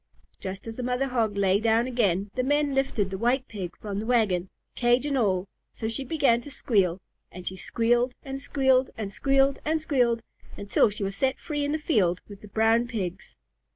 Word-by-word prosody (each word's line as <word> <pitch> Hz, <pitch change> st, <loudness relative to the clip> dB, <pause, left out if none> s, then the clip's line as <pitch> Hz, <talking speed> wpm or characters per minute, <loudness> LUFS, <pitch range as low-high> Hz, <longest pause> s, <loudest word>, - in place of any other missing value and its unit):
Just 190 Hz, 0 st, -6 dB
as 225 Hz, -1 st, -7 dB
the -, -, -3 dB
Mother 250 Hz, +2 st, -1 dB
Hog 225 Hz, -5 st, 0 dB
lay 195 Hz, 0 st, +3 dB
down 225 Hz, +1 st, +3 dB
again, 205 Hz, -6 st, 0 dB
the 255 Hz, -, 0 dB
men 290 Hz, +2 st, +1 dB
lifted 260 Hz, -8 st, 0 dB
the 190 Hz, -, -4 dB
White 250 Hz, +3 st, +1 dB
Pig 190 Hz, -5 st, -6 dB
from 200 Hz, -2 st, -4 dB
the 215 Hz, -, -4 dB
wagon, 200 Hz, -7 st, +2 dB, 0.2 s
cage 240 Hz, +2 st, +2 dB
and 290 Hz, -1 st, 0 dB
all, 195 Hz, -6 st, +1 dB, 0.2 s
so 220 Hz, -, -5 dB
she 225 Hz, +4 st, -2 dB
began 265 Hz, -5 st, +2 dB
to 290 Hz, -, -10 dB
squeal, 195 Hz, -10 st, +1 dB, 0.3 s
and 180 Hz, 0 st, -10 dB
she 185 Hz, -, -3 dB
squealed 240 Hz, +6 st, +1 dB
and 270 Hz, -1 st, -6 dB
squealed 265 Hz, -2 st, +2 dB
and 210 Hz, -3 st, -4 dB
squealed 275 Hz, +4 st, +2 dB
and 315 Hz, +1 st, +1 dB
squealed 245 Hz, -7 st, +1 dB, 0.3 s
until 200 Hz, +2 st, +2 dB
she 205 Hz, 0 st, -5 dB
was 195 Hz, 0 st, -2 dB
set 265 Hz, +4 st, 0 dB
free 295 Hz, -3 st, -3 dB
in 285 Hz, -, -1 dB
the 310 Hz, -, +1 dB
field 200 Hz, -, +1 dB
with 205 Hz, -1 st, -11 dB
the 210 Hz, -, -11 dB
Brown 225 Hz, +3 st, +2 dB
Pigs. 195 Hz, -7 st, -5 dB
235 Hz, 200 wpm, -26 LUFS, 200-265 Hz, 0.3 s, lay